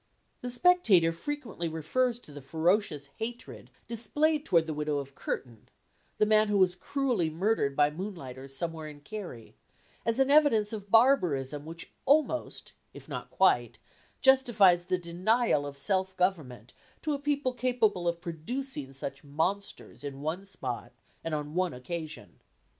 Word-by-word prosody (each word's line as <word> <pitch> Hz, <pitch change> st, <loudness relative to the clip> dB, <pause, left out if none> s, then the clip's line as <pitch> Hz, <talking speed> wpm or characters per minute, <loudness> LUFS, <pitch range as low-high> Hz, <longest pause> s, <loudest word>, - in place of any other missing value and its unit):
The 245 Hz, -, -4 dB
Spectator 245 Hz, -, +4 dB
frequently 215 Hz, -, -4 dB
refers 230 Hz, +11 st, 0 dB
to 150 Hz, -, -14 dB
the 145 Hz, 0 st, -9 dB
ferocious 160 Hz, 0 st, 0 dB
hatred 235 Hz, +2 st, -6 dB, 0.2 s
displayed 295 Hz, +7 st, 0 dB
toward 165 Hz, -2 st, +4 dB
the 160 Hz, -, -3 dB
widow 150 Hz, 0 st, -1 dB
of 140 Hz, -1 st, -5 dB
Curtin, 120 Hz, -4 st, -5 dB, 0.5 s
the 215 Hz, -, +4 dB
man 215 Hz, 0 st, +4 dB
who 205 Hz, -1 st, +2 dB
was 185 Hz, -2 st, +4 dB
cruelly 240 Hz, -, 0 dB
murdered 160 Hz, -4 st, 0 dB
by 145 Hz, 0 st, +4 dB
moonlighters 150 Hz, -7 st, -7 dB
somewhere 165 Hz, -1 st, -3 dB
in 150 Hz, -1 st, -11 dB
Kerry, 175 Hz, -, -8 dB, 0.5 s
as 230 Hz, +2 st, 0 dB
an 270 Hz, +1 st, +4 dB
evidence 250 Hz, -9 st, +4 dB
of 205 Hz, -2 st, -6 dB
barbarism 160 Hz, -, +3 dB
which 165 Hz, +1 st, -9 dB, 0.2 s
almost, 310 Hz, +2 st, +1 dB, 0.2 s
if -, -, -11 dB
not -, -, -6 dB
quite, -, -, +2 dB, 0.4 s
justifies 225 Hz, -10 st, +5 dB
the 185 Hz, -, +1 dB
denial 180 Hz, -1 st, +1 dB
of 140 Hz, 0 st, -8 dB
self 190 Hz, +5 st, -1 dB
government 140 Hz, -, -1 dB, 0.3 s
to 305 Hz, -, 0 dB
a 285 Hz, -, -2 dB
people 285 Hz, -2 st, 0 dB
capable 235 Hz, -8 st, +1 dB
of 170 Hz, 0 st, -1 dB
producing 170 Hz, -, -5 dB
such 140 Hz, +1 st, -6 dB
monsters 160 Hz, +6 st, -3 dB
in 140 Hz, -1 st, -6 dB
one 165 Hz, +6 st, -3 dB
spot 135 Hz, -14 st, -6 dB, 0.3 s
and 165 Hz, -1 st, -2 dB
on 150 Hz, 0 st, -4 dB
one 180 Hz, -4 st, 0 dB
occasion. 155 Hz, +5 st, -7 dB
180 Hz, 145 wpm, -29 LUFS, 150-235 Hz, 0.5 s, justifies